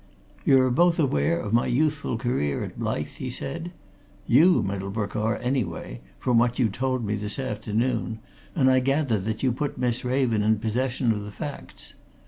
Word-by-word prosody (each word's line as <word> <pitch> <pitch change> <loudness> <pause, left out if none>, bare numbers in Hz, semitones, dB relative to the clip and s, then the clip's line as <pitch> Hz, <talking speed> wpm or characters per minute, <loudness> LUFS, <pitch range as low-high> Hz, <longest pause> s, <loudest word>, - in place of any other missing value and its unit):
"You're 130 -1 +4
both 170 +6 +3
aware 85 - +1
of 105 - -4
my 120 - +3
youthful 145 -2 0
career 115 - -1
at - - -8
Blyth?" 75 - -3
he 130 - -4
said. 170 +7 -4 0.5
"You, 170 +8 +5
Middlebrook, 100 +2 -3
are, 110 +2 0
anyway, 105 - -3 0.2
from 120 - +2
what 120 +1 +1
you 120 -4 +2
told 130 +3 -1
me 105 - -1
this 105 0 -2
afternoon, 115 -1 -2 0.4
and 135 -6 +3
I 130 - +5
gather 135 -3 +1
that 110 +5 -4
you 130 - +3
put 140 +4 -3
Miss 120 -1 0
Raven 125 -4 +1
in 110 +1 +3
possession 120 +3 0
of 105 -2 -2
the 105 - -7
facts. 105 - -8
120 Hz, 170 wpm, -25 LUFS, 105-130 Hz, 0.5 s, You